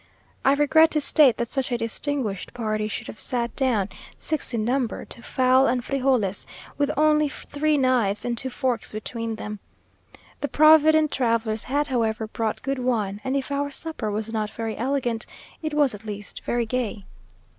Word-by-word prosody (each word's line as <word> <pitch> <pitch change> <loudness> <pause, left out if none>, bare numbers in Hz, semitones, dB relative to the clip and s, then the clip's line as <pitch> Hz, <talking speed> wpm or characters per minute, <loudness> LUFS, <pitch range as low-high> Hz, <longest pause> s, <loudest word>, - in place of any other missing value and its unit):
I 270 - +5
regret 315 +3 +5
to 305 - +2
state 290 -3 +4
that 235 - -1
such 270 -2 -1
a 240 - +1
distinguished 230 -3 -2
party 215 -2 -1
should 215 - -4
have 220 - -9
sat 240 -1 -2
down, 230 -8 +1 0.3
six 310 -2 0
in 225 -3 -1
number, 250 -1 -1
to 235 - -10
fowl 260 +1 +3
and 245 +1 0
frijoles, 255 -8 0 0.3
with 285 -1 +1
only 305 0 +4
three 295 +2 -1
knives 245 -7 +1
and 240 -1 -1
two 260 +2 0
forks 250 -3 -2
between 225 +1 -4
them. 210 -1 -6 0.8
The 285 - -1
provident 310 0 +5
travellers 230 -3 0
had, 290 +3 0
however, 225 -5 0
brought 220 0 -3
good 275 0 -2
wine; 215 -5 -1
and 265 +1 -1
if 275 +1 -4
our 285 0 -1
supper 285 -6 -3
was 215 +2 -3
not 215 -1 -1
very 225 0 -4
elegant, 245 -2 -1 0.3
it 310 -2 -3
was 290 -5 +3
at 205 +1 -9
least 205 -2 -7
very 240 -1 0
gay. 220 -4 -3
245 Hz, 175 wpm, -24 LUFS, 220-280 Hz, 0.8 s, I